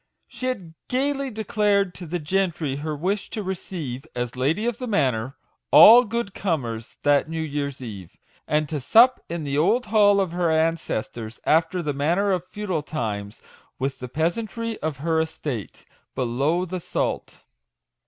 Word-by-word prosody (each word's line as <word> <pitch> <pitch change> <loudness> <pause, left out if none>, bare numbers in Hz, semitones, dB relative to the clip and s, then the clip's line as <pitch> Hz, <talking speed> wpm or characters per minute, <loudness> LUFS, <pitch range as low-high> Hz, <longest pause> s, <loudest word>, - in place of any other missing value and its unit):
She 255 - -5
had 190 -11 -4 0.2
gaily 275 +1 0
declared 210 -3 +1
to 175 - -9
the 175 +3 -2
gentry 170 -4 -1
her 155 +1 -3
wish 190 +7 -2
to 215 - -4
receive, 170 -8 -5
as 120 0 -3
lady 150 - 0
of 240 -2 -1
the 250 - -4
manor, 130 - 0 0.3
"all 240 +3 +9
good 225 -2 -3
comers," 120 - -3
that 145 +1 +3
New 165 0 -3
Year's 140 -3 -4
Eve; 100 -7 -9 0.3
and 150 0 +1
to 150 0 -3
sup 235 - +5
in 170 -1 -3
the 140 0 -1
old 220 +10 +2
hall 205 -2 +4
of 190 -4 0
her 175 -1 0
ancestors, 160 -8 -1
after 165 +3 +2
the 150 -2 -1
manner 170 +9 +1
of 180 -1 -1
feudal 195 -6 -3
times, 105 -9 -4 0.3
with 135 +1 -3
the 125 - -6
pea 160 +6 +1
santry 230 +2 -5
of 155 -3 -2
her 165 -1 +2
estate 145 -8 -5
" - - -45
below 135 +8 0
the 185 +1 -4
salt." - - -3
165 Hz, 165 wpm, -24 LUFS, 140-200 Hz, 0.3 s, all